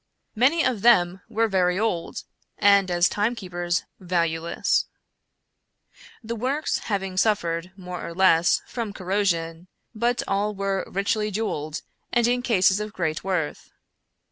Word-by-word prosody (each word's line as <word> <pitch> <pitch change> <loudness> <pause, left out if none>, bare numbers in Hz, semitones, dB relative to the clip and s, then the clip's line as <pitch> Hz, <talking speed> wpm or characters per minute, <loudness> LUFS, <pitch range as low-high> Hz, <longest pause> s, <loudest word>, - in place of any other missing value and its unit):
Many 275 +8 +3
of 230 -6 0
them 190 -5 +4
were 225 0 +1
very 180 -3 +1
old, 195 -6 -2 0.3
and 200 -2 +4
as 175 0 +3
timekeepers 185 -6 -1 0.2
valueless; 170 -2 0 1.4
the 230 +1 -4
works 265 +7 -1
having 195 -3 -2
suffered, 180 -4 0
more 180 -2 -7
or 170 0 -6
less, 175 -2 +4
from 230 -4 -5
corrosion 180 -4 -1
— - - -50
but 240 +2 0
all 205 +1 0
were 195 -1 -2
richly 210 +2 0
jeweled 170 -7 -3 0.3
and 240 -1 +3
in 245 +1 +1
cases 200 -5 +3
of 210 0 -5
great 160 -3 -2
worth. 180 -5 -2
195 Hz, 130 wpm, -24 LUFS, 175-215 Hz, 1.4 s, them